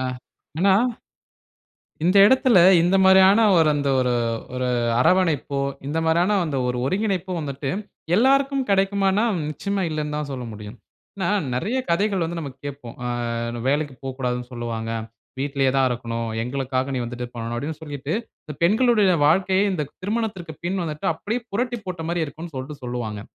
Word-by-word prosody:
ஆ. 130 - -2 0.5
ஆனா. 190 +1 +4 1.3
இந்த 185 +3 +4
இடத்துல 255 -3 +5 0.2
இந்த 180 +3 +3
மாரியான 190 +3 +6 0.2
ஒரு 160 -1 +5
அந்த 140 -1 0
ஒரு 125 -1 +1 0.4
ஒரு 125 0 -1 0.3
அரவணைப்போ, 150 -4 +2 0.3
இந்த 155 +3 -2
மாரியான 175 +6 +3 0.3
ஒரு 125 0 -1
ஒருங்கிணைப்பு 190 +1 -1
வந்துட்டு 140 -2 -4 0.5
எல்லாருக்கும் 275 +3 +3
கிடைக்குமானா 195 +1 +2 0.3
நிச்சயமா 200 +6 -2
இல்லன்னு 150 -1 -3
தான் 150 -1 -3
சொல்ல 125 -2 -5
முடியும். 105 +2 -9 0.4
ஏனா, 190 -2 -1 0.3
நிறைய 215 - -1
கதைகள் 195 +1 +1
வந்து 170 +1 -4
நம்ம 140 -4 -5
கேட்போம். 140 -4 -7
ஆ - - -1 0.6
வேலைக்கு 145 -1 0
போகக்கூடாதுன்னு 125 -2 -3
சொல்லுவாங்க. 115 -2 -4 0.5
வீட்டிலேயே 135 -1 +1
தான் 135 -1 +4
இருக்கணும். 115 -1 -3 0.2
எங்களுக்காக 130 +1 -2
நீ - - -1
வந்துட்டு 125 +1 -5
பண்ணனும் 115 0 -4
அப்டின்னு 155 +4 -4
சொல்லிட்டு, 145 0 -5 0.3
இந்த 150 - -7
பெண்களுடைய 215 0 +4
வாழ்க்கைய 190 +4 +3
இந்த 150 -4 -2 0.2
திருமணத்திற்கு 195 -6 -3
பின் 185 +1 -1
வந்துட்டு 155 -2 -4
அப்டியே 225 +9 -3
புரட்டி 240 +2 -1
போட்ட 180 -3 -5
மாதிரி 170 -1 0
இருக்கும்ன்னு 160 +1 -9
சொல்ட்டு 140 +2 -7
சொல்வாங்க. 115 -4 -4
155 Hz, 145 wpm, -23 LUFS, 130-195 Hz, 1.3 s, மாரியான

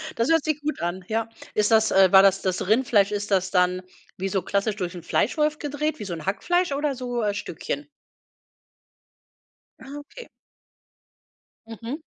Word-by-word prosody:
Das 230 +5 0
hört 325 -2 +4
sich 305 -1 -1
gut 305 +1 -3
an, 175 +2 -3
ja. 225 +1 -1 0.3
Ist 210 +1 +2
das 220 -1 +4
äh, 190 -1 +5
war 190 - +9
das 195 0 +4
das 185 -1 -1
Rindfleisch 215 -3 +3
ist 205 0 -3
das 185 -1 +2
dann 180 -1 +2 0.4
wie 195 +1 -2
so 190 0 0
klassisch 200 +2 -1
durch 180 -3 -4
'n 175 - -7
Fleischwolf 300 +6 +1
gedreht, 295 +1 -2
wie 210 - -5
so 185 - -4
'n 160 -2 -7
Hackfleisch 350 - 0
oder 290 0 -1
so, 245 -2 -3
äh, 205 - 0
Stückchen? 205 - -5 1.9
Ah, 270 +2 -11
okay. 465 - -12 1.4
Mhm. 230 +4 -6
215 Hz, 170 wpm, -24 LUFS, 195-285 Hz, 1.9 s, war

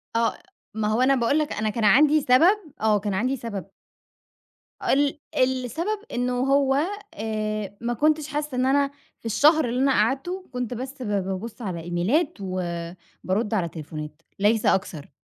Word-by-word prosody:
آه، 230 0 +1 0.4
ما 215 0 -1
هو 215 +3 +1
أنا 270 +1 +4
باقول 255 +4 +2
لك 300 - -1
أنا 215 0 -1
كان 225 +1 -2
عندي 295 +7 +5
سبب، 325 +12 +5 0.2
آه، 215 -1 +3
كان 205 0 -3
عندي 250 +8 0
سبب. 225 -5 -5 1.2
ال 285 +1 +2 0.2
السبب 260 - 0
إنّه 245 0 0
هو 270 +1 +3 0.4
آآ، 215 -2 -3
ما 240 +1 -1
كنتش 305 +4 +1
حاسّة 295 -2 -3
إن 255 - +2
أنا 275 +1 +2 0.3
في - - -26
الشهر 300 +8 +4
اللي 245 +2 -1
أنا 275 0 +4
قعدته، 270 - 0
كنت 250 -1 -3
بس 260 +3 -7
با 205 -4 0
بابص 195 +5 -5
على 185 -6 -4
إيميلات 180 - 0
وبارد 185 +3 -4
على 185 -6 +1
تليفونات 150 -1 -8 0.2
ليس 215 +2 +2
أكتر. 160 -6 0
235 Hz, 155 wpm, -24 LUFS, 205-275 Hz, 1.2 s, عندي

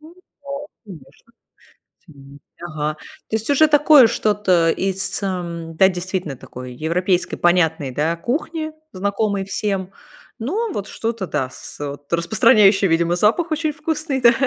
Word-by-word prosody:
Ну 315 +3 -15
да, 285 -5 -9 0.2
конечно. 195 +4 -15 0.8
Мгм, 140 -1 -15 0.2
ага. 155 -2 -3
То 220 - -7
есть 220 +3 -5
уже 305 +2 +5
такое 295 -3 +7
что-то 200 -7 +2
из, 195 +3 -2
эм, 170 -4 -4
да, 190 - +6
действительно 180 -5 -4
такой 125 0 -10
европейской 175 +6 0
понятной, 160 -6 +2
да, 155 +5 0
кухни, 310 - -3 0.2
знакомой 200 +1 -1
всем. 195 -1 -3 0.5
Но 395 - -2
вот 205 0 -4
что-то, 225 -4 -3
да, 145 -4 -1
с - - -11
вот 145 0 -7
распространяющее, 200 +1 +4
видимо, 170 +1 +2
запах 230 - +2
очень 310 -1 0
вкусный, 300 -2 -2
да, 235 -1 +7
195 Hz, 135 wpm, -20 LUFS, 165-250 Hz, 0.8 s, такое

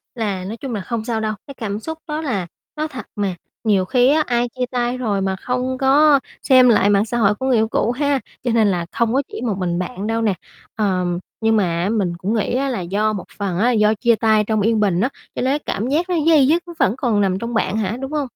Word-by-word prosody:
là 205 -5 -2
nói 210 +5 -6
chung 260 -2 -5
là 205 - -2
không 230 +1 -4
sao 230 -2 -1
đâu, 215 0 -1
cái 275 - -8
cảm 210 -5 -4
xúc 320 +8 -6
đó 305 +1 -3
là 205 - -2 0.3
nó 310 +1 -2
thật 265 -4 -8
mà, 200 -4 -1 0.3
nhiều 200 -4 +2
khi 250 +3 +3
á, 310 0 +3
ai 240 0 +1
chia 250 +1 -3
tay 245 0 -1
rồi 210 -6 -1
mà 190 0 0
không 250 +5 -2
có 280 +2 +5 0.2
xem 255 -2 +6
lại 205 -3 +4
mạng 205 +1 +3
xã 240 +2 -3
hội 210 -3 +3
của 260 - -5
người 260 -2 +3
yêu 220 0 +2
cũ 225 +1 0
ha? 285 +1 0 0.2
Cho 245 - 0
nên 225 -2 +3
là 175 -4 0
không 235 -1 0
có 270 - +3
chỉ - - -6
một 230 -5 -1
mình 175 -2 -1
bạn 185 +3 -4
đâu 225 0 0
nè. 215 -3 +2 0.4
Ờm, 180 -4 0 0.2
nhưng 225 0 +3
mà, 210 - +3 0.2
á, 190 - 0
mình 200 -6 0
cũng 190 +5 -2
nghĩ 225 +1 0
á, 270 +1 0
là 235 -7 -2
do 205 +5 0
một 195 - -5
phần 195 -4 -2
á, 240 +4 +3
do 210 -2 +3
chia 235 +2 +2
tay 220 -1 +3
trong 215 -1 +1
yên 220 +1 +2
bình 195 -3 +2
á, 250 - +2 0.3
cho - - -2
nên 270 +4 0
cảm 220 - -2
giác 320 +7 0
nó 360 - +1
day 305 -5 +6
dứt 330 +4 +2
nó 345 - -8
vẫn 205 - +2
còn 230 -6 +1
nằm 190 -1 +1
trong 235 +2 -4
bạn 220 -2 0
hả, 220 +2 -1
đúng 270 +2 -5
hông? 300 -1 0
225 Hz, 270 wpm, -20 LUFS, 205-255 Hz, 0.4 s, xem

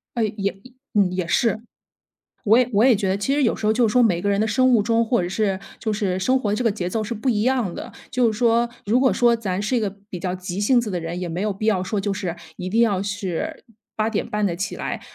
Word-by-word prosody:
呃， 230 -2 +1
也 200 -1 -1 0.4
嗯， 200 -3 +3
也 185 -2 -2
是。 220 +6 +1 0.9
我 220 +3 +6
也 250 -1 +3
我 210 +3 +4
也 255 -2 +6
觉 195 -2 -1
得 190 - +1
其 235 +7 0
实 290 - +1
有 230 - +2
时 215 - -5
候 215 - +4
就 235 0 +3
是 - - -1
说 250 - +5
每 180 -6 +2
个 205 - 0
人 200 0 +1
的 220 - +2
生 255 +4 +3
物 230 -4 +4
钟， 230 +1 +2
或 235 -4 +1
者 175 - -3
是 195 -1 0 0.2
就 220 -2 -1
是 190 -3 -1
生 255 +7 +2
活 215 -5 -1
的 - - +1
这 230 - -2
个 230 - +3
节 180 -4 -3
奏 220 +4 -1
是 215 - -4
不 230 +4 -2
一 215 -3 +1
样 250 -8 +1
的。 - - -7 0.2
就 245 -4 +2
是 210 - -7
说 235 0 +3 0.2
如 230 +5 +3
果 260 -1 +3
说 240 -1 +4
咱 200 -4 -3
是 215 +5 0
一 - - +2
个 210 -3 -1 0.2
比 180 - -6
较 180 +1 -2
急 185 +1 -5
性 240 +4 +4
子 230 -3 -3
的 180 - -2
人， 165 +2 -5
也 180 - -4
没 170 +3 -3
有 210 0 0
必 200 +3 -5
要 205 -4 +2
说 205 +2 -2
就 200 0 -1
是 185 -3 -4 0.2
一 180 - -5
定 225 +4 +2
要 200 -5 +2
是 200 - -4 0.3
8:30 210 -1 -1
再 180 - 0
起 200 +2 -3
来。 - - -4
210 Hz, 295 characters per minute, -22 LUFS, 190-235 Hz, 0.9 s, 我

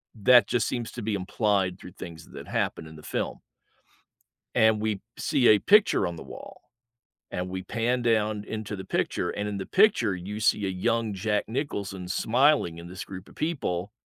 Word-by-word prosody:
That 120 +1 +6
just 120 -2 +1
seems 120 -2 -3
to 120 - -7
be 105 -1 -1
implied 100 -1 0
through 90 - -11
things 85 -4 -10
that - - -8
happened 80 - -2
in 80 - -12
the - - -12
film - - -3 1.2
and 110 -1 +4
we 105 -3 -1 0.2
see 140 -6 +2
a 105 - +7
picture 210 - +4
on 85 - -5
the - - -9
wall, - - -11 0.7
and 90 +1 -3
we 95 0 -4
pan 120 +6 -1
down 110 -3 +1
into 110 -1 -5
the 95 - -7
picture, 90 -1 -1
and 105 0 -3
in 105 - -3
the 95 - -5
picture, 185 - +4
you 95 +4 -6
see 105 -1 +2
a - - -1
young 115 +4 0
Jack 105 +2 0
Nicholson 100 -8 -4
smiling 120 - +2
in 85 +1 -9
this 90 +1 -7
group 95 -1 -9
of - - -16
people- 105 - -2
105 Hz, 190 wpm, -27 LUFS, 95-115 Hz, 1.2 s, a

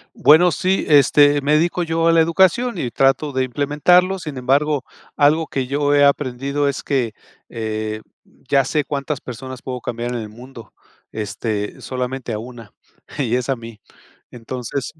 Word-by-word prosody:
Bueno, 175 +4 +5
sí, 190 +2 0
este, 145 0 +5
me 145 +2 +1
dedico 170 +3 +1
yo 165 0 0
a 165 - +5
la 165 0 +5
educación 190 +8 +2
y 125 -7 -3
trato 135 +4 +2
de 130 -1 0
implementarlo. 150 +8 +2
Sin 150 -6 -7
embargo, 140 +2 +1 0.3
algo 155 +2 +3
que 130 -2 -3
yo 145 +2 0
he 145 0 +5
aprendido 140 +1 0
es 140 -1 -3
que, 125 -6 -1 0.4
eh, 110 -1 -4 0.5
ya 135 -2 +3
sé 150 +2 0
cuántas 140 0 -4
personas 130 +1 -8
puedo 125 -1 -5
cambiar 120 +1 -4
en 120 - -3
el 110 -2 -7
mundo. 115 -1 -13 0.4
Este 105 0 -4
solamente 125 -2 -4
a 105 - -3
una 115 -2 -11 0.5
y 125 -3 0
es 125 +2 -2
a 135 - +2
mí. 115 -2 -11 0.5
Entonces, 125 +3 -5
135 Hz, 165 wpm, -20 LUFS, 120-150 Hz, 0.5 s, Bueno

